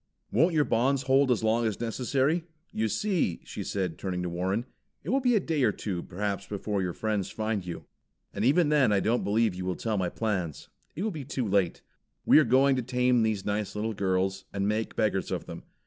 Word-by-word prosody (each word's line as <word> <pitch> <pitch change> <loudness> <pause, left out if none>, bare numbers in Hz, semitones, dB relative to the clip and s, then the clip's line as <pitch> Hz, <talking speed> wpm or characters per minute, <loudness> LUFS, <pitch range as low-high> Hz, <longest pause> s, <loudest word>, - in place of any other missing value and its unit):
"Won't 165 +1 +3
your 150 -2 +4
bonds 130 +4 +1
hold 135 +1 +3
as 120 -3 +1
long 115 +1 +2
as 110 - -3
necessary? 135 +7 0 0.3
You 110 +1 0
see," 175 - 0
she - - -6
said, 90 -5 -3
turning 90 -2 -3
to 90 - -2
Warren, 95 +7 -1 0.4
"it 155 - -6
will 270 - +3
be 250 -3 +3
a - - +5
day 160 -5 -1
or 120 -5 +4
two 95 -4 -4
perhaps 100 +2 -3
before 100 0 -2
your 90 -2 -2
friends 105 -2 -2
find 110 -3 -2
you. 85 -1 -7 0.5
And 100 - -2
even 150 +6 +4
then 145 -7 +4
I 100 - +3
don't 115 +5 +1
believe 110 0 +2
you 90 +1 -5
will 90 0 -2
tell 110 0 -2
my 90 -2 0
plans. 95 -9 -3 0.3
It 175 - -3
will 220 - 0
be 155 -6 -6
too 130 -3 -3
late. 95 -3 +1 0.4
We - - +7
are - - +5
going 135 +2 +4
to - - +1
tame 125 0 +2
these 110 -3 0
nice 105 0 -2
little 110 +2 -2
girls, 95 -1 -1
and 100 0 -1
make 110 +1 -1
beggars 105 -3 0
of - - -3
them. - - -8
110 Hz, 220 wpm, -28 LUFS, 100-130 Hz, 0.5 s, We